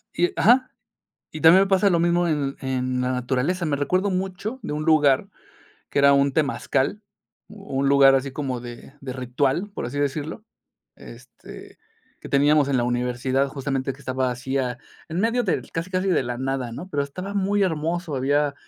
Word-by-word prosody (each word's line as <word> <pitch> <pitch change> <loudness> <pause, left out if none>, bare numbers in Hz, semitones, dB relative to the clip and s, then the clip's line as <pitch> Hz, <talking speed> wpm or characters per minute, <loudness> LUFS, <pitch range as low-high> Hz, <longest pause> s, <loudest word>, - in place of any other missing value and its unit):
y 355 +2 +2
ajá. 255 +3 +4 0.6
Y 155 - -7
también 170 +4 +7
me - - -2
pasa 195 +1 +4
lo 170 -3 +2
mismo 175 +1 +2
en 145 -4 -1
en 130 -1 -2
la 125 0 0
naturaleza, 130 +8 -1
me 150 - 0
recuerda 185 +8 0
mucho 190 +6 -3
a - - -2
un 150 +1 -3
lugar 150 -4 +3 0.6
que - - -1
era 140 0 +6 0.2
temazcal, 145 +4 0 0.5
u 200 -10 -7
un 140 - +2
lugar 135 -1 +6
así 135 0 -1
como 135 -3 -3
de 120 +3 -10
ritual, 130 - -2
por 200 - -5
así 140 +4 -5
decirlo, 145 +7 -3 0.5
este, - - -13 0.4
que - - -9
teníamos 145 0 +3
en 135 - +1
la 120 - +1
universidad, 125 +2 0
justamente 135 -1 -3
que 135 - -18
estaba 130 -1 -1
así, 130 +2 -3
ah, 125 -2 -2 0.3
en 170 +2 -2
medio 230 +3 +1
del, - - -2
casi, 165 +2 -3
casi 185 +1 -1
de 180 - +2
la 120 0 -4
nada, 130 -2 -3
¿no? 175 +10 -8
Pero 145 -5 -1
estaba 185 +8 -6
muy 200 +1 +1
hermoso, 165 -2 -1
había, 145 +2 +1
145 Hz, 180 wpm, -23 LUFS, 130-180 Hz, 0.6 s, también